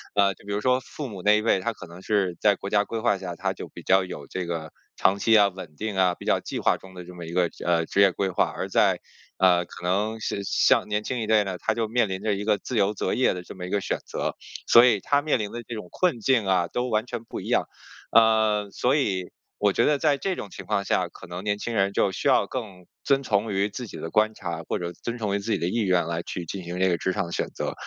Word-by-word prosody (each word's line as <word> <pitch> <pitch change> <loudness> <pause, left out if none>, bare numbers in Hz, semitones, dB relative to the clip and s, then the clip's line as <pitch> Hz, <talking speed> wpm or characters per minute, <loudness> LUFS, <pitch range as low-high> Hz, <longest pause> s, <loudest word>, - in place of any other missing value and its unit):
呃， 100 -1 +4
就 - - -21
比 - - -4
如 100 - 0
说 125 +3 +3
父 145 +2 -7
母 100 -6 -8
那 105 0 +5
一 - - 0
辈， 110 -4 +3
他 105 +5 -1
可 - - -11
能 85 +2 -12
是 95 -4 0
在 105 -1 +5
国 100 - -6
家 105 -1 +4
规 115 +2 -4
划 105 -2 +2
下， 90 -2 -5
他 - - -2
就 - - -8
比 - - -11
较 95 0 +4
有 90 - -7
这 95 -1 -4
个 80 -2 -4 0.2
长 100 +1 +2
期 110 +1 +5
啊， 100 -1 +6
稳 90 -5 -10
定 105 +4 -4
啊， 90 -2 +3
比 - - -12
较 - - +2
计 - - -6
划 - - +3
中 95 0 -15
的 90 - -8
这 90 - -11
么 85 -1 -8
一 85 - -7
个， 90 -1 +3 0.2
呃， 85 -1 +2
职 100 - +1
业 100 -1 +6
规 95 +2 -1
划。 - - +2
而 - - -4
在， - - +3 0.4
呃， 90 -2 +4
可 - - -12
能 105 +5 0
像 105 - -3
像 - - +3
年 105 0 0
轻 125 +3 -3
一 110 - -3
代 110 -1 +4
呢， 95 -2 -4
他 110 - 0
就 115 -1 -1
面 115 -1 +1
临 95 +1 -4
着 110 -1 +1
一 100 +1 -3
个 105 -1 +3
自 125 - -4
由 100 0 +2
择 95 - -1
业 130 - +2
的 90 - -6
这 - - -10
么 90 -1 -6
一 - - -7
个 100 - +1
选 95 - -2
择。 - - -3 0.3
所 120 +1 +8
以 110 -5 +3
他 145 0 +2
面 150 -2 +1
临 105 -3 -4
的 120 - -5
这 120 - -5
种 105 -5 -7
困 180 -10 +1
境 115 -2 +2
啊， 90 -2 +2
都 125 +7 -2
完 110 0 +1
全 120 -2 -6
不 - - -6
一 - - -8
样。 - - +2 0.5
呃， 110 -2 +4
所 125 +7 +1
以 95 -10 0 0.3
我 100 -1 +3
觉 - - +2
得 150 -1 +2
在 145 -2 +2
这 190 +5 -2
种 105 - -7
情 - - -10
况 - - 0
下， - - +1
可 - - -13
能 90 +2 -6
年 105 -1 0
轻 120 +1 -4
人 100 -1 +2
就 100 - +2
需 - - -2
要 - - +4
更 100 -8 -6 0.2
遵 140 -1 +3
从 105 -2 0
于 100 +1 +1
自 125 +4 -6
己 - - -9
的 80 - -5
观 110 +1 +3
察， 85 -4 -5
或 - - -1
者 85 0 -4
遵 120 +6 -5
从 105 -4 -1
于 - - 0
自 105 +3 -4
己 - - +2
的 85 - -1
意 115 +6 0
愿， 90 -4 +2
来 85 0 -2
去 85 0 -5
进 95 +3 -6
行 90 +1 -5
这 95 - +3
个 85 - +1
职 95 - -1
场 95 - -1
的 85 - -8
选 - - -1
择。 - - -4
100 Hz, 310 characters per minute, -25 LUFS, 90-110 Hz, 0.5 s, 所